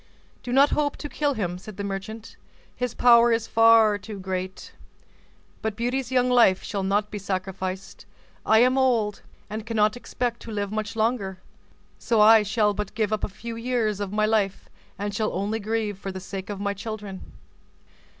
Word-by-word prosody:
"Do 245 Hz, -, -6 dB
not 275 Hz, +3 st, +5 dB
hope 290 Hz, -1 st, 0 dB
to 295 Hz, -, -6 dB
kill 290 Hz, -1 st, -1 dB
him," 180 Hz, -5 st, -3 dB
said 200 Hz, +1 st, -11 dB
the 200 Hz, -, -4 dB
merchant, 200 Hz, +3 st, -6 dB, 0.4 s
"his 250 Hz, -2 st, -3 dB
power 235 Hz, -1 st, +6 dB
is 230 Hz, -1 st, +1 dB
far 225 Hz, -2 st, +5 dB
too 205 Hz, 0 st, -8 dB
great. 185 Hz, 0 st, -5 dB, 0.9 s
But 220 Hz, -2 st, -2 dB
Beauty's 245 Hz, +2 st, -2 dB
young 250 Hz, -1 st, +3 dB
life 235 Hz, -7 st, +4 dB
shall 200 Hz, -, -3 dB
not 205 Hz, +2 st, 0 dB
be 210 Hz, -, -4 dB
sacrificed; 190 Hz, -1 st, -5 dB, 0.4 s
I 220 Hz, +1 st, +5 dB
am 255 Hz, +2 st, +3 dB
old, 230 Hz, -6 st, +1 dB, 0.3 s
and 215 Hz, +1 st, -5 dB
cannot 215 Hz, -1 st, +1 dB
expect 245 Hz, -1 st, -3 dB
to 230 Hz, -, -9 dB
live 205 Hz, -1 st, -3 dB
much 215 Hz, +1 st, -3 dB
longer; 215 Hz, -4 st, -1 dB, 0.6 s
so 230 Hz, -2 st, +1 dB
I 220 Hz, +1 st, +8 dB
shall 210 Hz, 0 st, +1 dB
but 205 Hz, 0 st, -5 dB
give 215 Hz, -1 st, 0 dB
up 215 Hz, -, -2 dB
a -, -, +1 dB
few 230 Hz, +4 st, -7 dB
years 230 Hz, -3 st, -1 dB
of 200 Hz, -2 st, -3 dB
my 215 Hz, +1 st, +1 dB
life, 210 Hz, -3 st, 0 dB, 0.3 s
and 205 Hz, +1 st, -3 dB
shall 215 Hz, +1 st, -1 dB
only 210 Hz, +3 st, -2 dB
grieve 215 Hz, -2 st, -2 dB
for 195 Hz, -, -5 dB
the 190 Hz, -, -6 dB
sake 190 Hz, 0 st, -7 dB
of 205 Hz, -2 st, -5 dB
my 200 Hz, 0 st, -1 dB
children." 200 Hz, -2 st, -7 dB
215 Hz, 180 wpm, -25 LUFS, 200-230 Hz, 0.9 s, I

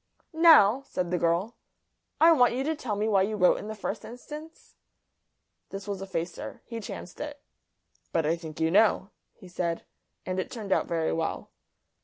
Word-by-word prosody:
"Now," 315 Hz, -8 st, +7 dB
said 180 Hz, -8 st, -3 dB
the 180 Hz, -, +1 dB
girl, 175 Hz, +7 st, 0 dB, 0.6 s
"I 330 Hz, +2 st, +7 dB
want 245 Hz, -6 st, +4 dB
you 260 Hz, -, -1 dB
to 315 Hz, +3 st, -1 dB
tell 245 Hz, -8 st, -3 dB
me 210 Hz, +2 st, -1 dB
why 200 Hz, -3 st, +3 dB
you 210 Hz, +3 st, 0 dB
wrote 180 Hz, -3 st, +4 dB
in -, -, -7 dB
the 220 Hz, -, -5 dB
first 210 Hz, +1 st, -4 dB
instance?" 300 Hz, +7 st, -10 dB, 1.0 s
This 195 Hz, +1 st, -7 dB
was 200 Hz, -2 st, -4 dB
a 195 Hz, -, -6 dB
facer. 170 Hz, -2 st, -5 dB
He 230 Hz, -1 st, -6 dB
chanced 185 Hz, -4 st, -8 dB
it. 295 Hz, -1 st, -6 dB, 0.7 s
"But 165 Hz, -2 st, +1 dB
I 160 Hz, +2 st, +2 dB
think 160 Hz, -2 st, -9 dB
you 160 Hz, 0 st, +1 dB
know," 205 Hz, 0 st, +3 dB, 0.2 s
he 190 Hz, -, -14 dB
said; 170 Hz, -1 st, -3 dB, 0.4 s
and 185 Hz, 0 st, -2 dB
it 185 Hz, -, -3 dB
turned 215 Hz, -5 st, -7 dB
out -, -, +2 dB
very 165 Hz, -1 st, 0 dB
well. 165 Hz, 0 st, -3 dB
200 Hz, 185 wpm, -28 LUFS, 175-240 Hz, 1.0 s, Now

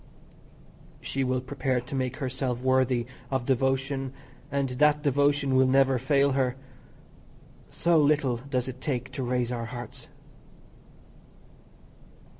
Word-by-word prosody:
She 135 Hz, -, -2 dB
will 130 Hz, 0 st, 0 dB
prepare 130 Hz, 0 st, -1 dB
to 125 Hz, +3 st, -9 dB
make 130 Hz, -1 st, -2 dB
herself 130 Hz, -3 st, -2 dB
worthy 130 Hz, -2 st, +2 dB, 0.2 s
of 130 Hz, -2 st, -1 dB
devotion, 135 Hz, +1 st, 0 dB, 0.4 s
and 140 Hz, -1 st, 0 dB
that 150 Hz, +3 st, +2 dB
devotion 140 Hz, -1 st, +2 dB
will 130 Hz, 0 st, +5 dB
never 135 Hz, -1 st, +3 dB
fail 140 Hz, +2 st, +2 dB
her. 130 Hz, -2 st, +1 dB, 1.1 s
So 170 Hz, -1 st, +2 dB
little 145 Hz, -4 st, +2 dB
does 125 Hz, 0 st, -3 dB
it 130 Hz, 0 st, -7 dB
take 130 Hz, -2 st, -3 dB
to 135 Hz, -, -5 dB
raise 125 Hz, -1 st, -1 dB
our 120 Hz, -1 st, -3 dB
hearts. 120 Hz, 0 st, -8 dB
130 Hz, 120 wpm, -27 LUFS, 125-140 Hz, 1.1 s, will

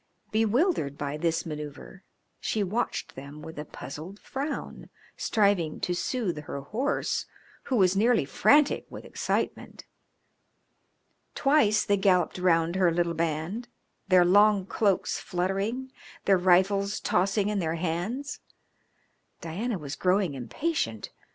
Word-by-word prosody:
Bewildered 225 Hz, -, +1 dB
by 145 Hz, 0 st, -3 dB
this 165 Hz, +1 st, -1 dB
manoeuvre 150 Hz, +4 st, -7 dB, 0.4 s
she 215 Hz, -, -1 dB
watched 215 Hz, +6 st, -2 dB
them 140 Hz, +3 st, -10 dB
with 160 Hz, -1 st, -8 dB
a 150 Hz, -, -5 dB
puzzled 160 Hz, +9 st, -9 dB
frown, 280 Hz, +2 st, -5 dB, 0.3 s
striving 200 Hz, -7 st, +1 dB
to 180 Hz, -, 0 dB
soothe 185 Hz, -3 st, -2 dB
her 140 Hz, -, -5 dB
horse, 245 Hz, -, -1 dB, 0.4 s
who 260 Hz, -, -1 dB
was 190 Hz, -4 st, +4 dB
nearly 225 Hz, -, +3 dB
frantic 290 Hz, -, +3 dB
with -, -, -9 dB
excitement. -, -, -3 dB, 1.5 s
Twice 275 Hz, -7 st, +3 dB
they 205 Hz, -2 st, +2 dB
galloped 185 Hz, -3 st, +2 dB
round 170 Hz, -1 st, +2 dB
her 180 Hz, -3 st, +4 dB
little 170 Hz, 0 st, 0 dB
band, 165 Hz, +8 st, -2 dB, 0.4 s
their 185 Hz, -2 st, +6 dB
long 205 Hz, +1 st, +5 dB
cloaks 200 Hz, -1 st, 0 dB
fluttering, 195 Hz, +9 st, -2 dB, 0.3 s
their 195 Hz, -2 st, +4 dB
rifles 195 Hz, +3 st, +3 dB
tossing 195 Hz, +3 st, +1 dB
in 210 Hz, -1 st, 0 dB
their 165 Hz, -2 st, -1 dB
hands. 180 Hz, -, -3 dB, 1.0 s
Diana 200 Hz, +8 st, -3 dB
was 145 Hz, -4 st, -6 dB
growing 185 Hz, -3 st, +1 dB
impatient. 130 Hz, -, -3 dB
185 Hz, 120 wpm, -27 LUFS, 165-215 Hz, 1.5 s, their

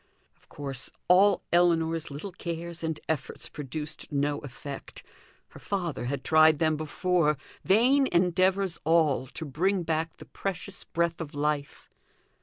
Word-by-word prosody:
Of -, -, -31 dB
course, 135 Hz, -2 st, -4 dB, 0.2 s
all 195 Hz, +3 st, +5 dB
Ellinor's 165 Hz, -2 st, +3 dB
little 150 Hz, +8 st, -6 dB
cares 170 Hz, -1 st, -6 dB
and 160 Hz, -1 st, -2 dB
efforts 150 Hz, -5 st, -2 dB
produced 150 Hz, +2 st, -6 dB
no 145 Hz, 0 st, 0 dB
effect; 140 Hz, 0 st, -8 dB, 0.5 s
her -, -, -13 dB
father 175 Hz, -10 st, -3 dB
had 135 Hz, +1 st, -3 dB
tried 155 Hz, -1 st, +6 dB
them 155 Hz, 0 st, +2 dB
before 155 Hz, 0 st, +1 dB, 0.3 s
vain 260 Hz, +7 st, +4 dB
endeavours 185 Hz, 0 st, +2 dB
all, 155 Hz, -5 st, +3 dB
to 160 Hz, -, -6 dB
bring 180 Hz, +6 st, 0 dB
back 160 Hz, 0 st, -2 dB
the -, -, -11 dB
precious 195 Hz, 0 st, -4 dB
breath 170 Hz, 0 st, -1 dB
of 150 Hz, -1 st, -7 dB
life! 145 Hz, -1 st, -2 dB
160 Hz, 135 wpm, -28 LUFS, 150-180 Hz, 0.5 s, tried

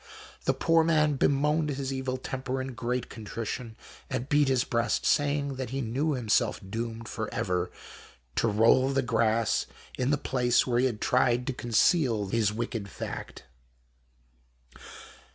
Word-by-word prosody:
The -, -, +2 dB
poor 165 Hz, -1 st, +3 dB
man 155 Hz, -2 st, +3 dB
bemoaned 150 Hz, +3 st, +2 dB
his 135 Hz, -1 st, -3 dB
evil 130 Hz, -1 st, -2 dB
temper 130 Hz, 0 st, -4 dB
in 130 Hz, 0 st, -4 dB
great 120 Hz, +1 st, -2 dB
contrition, 115 Hz, +1 st, -6 dB, 0.3 s
and 130 Hz, -2 st, -3 dB
beafot 145 Hz, -1 st, +3 dB
his 130 Hz, -2 st, +2 dB
breast, 115 Hz, -2 st, 0 dB
saying 145 Hz, -2 st, +1 dB
that 130 Hz, -3 st, -4 dB
he 135 Hz, +2 st, -3 dB
knew 135 Hz, +6 st, 0 dB
himseilf 110 Hz, -4 st, 0 dB
doomed 115 Hz, 0 st, -4 dB
for 110 Hz, -1 st, -4 dB
ever 90 Hz, -1 st, -1 dB, 0.7 s
to -, -, +3 dB
roll 115 Hz, +5 st, +4 dB
the 135 Hz, 0 st, +1 dB
grass 115 Hz, -2 st, +1 dB, 0.3 s
in 125 Hz, +1 st, +1 dB
tlie 145 Hz, -1 st, 0 dB
place 125 Hz, -2 st, +2 dB
where 120 Hz, -2 st, +1 dB
he 130 Hz, -, +4 dB
had 115 Hz, -4 st, -5 dB
tried 125 Hz, -1 st, +2 dB
to 135 Hz, -, -2 dB
conceal 120 Hz, -, +2 dB
hm 110 Hz, -2 st, +1 dB
wicked 115 Hz, -3 st, -4 dB
fact. -, -, -7 dB
125 Hz, 150 wpm, -28 LUFS, 115-135 Hz, 0.7 s, roll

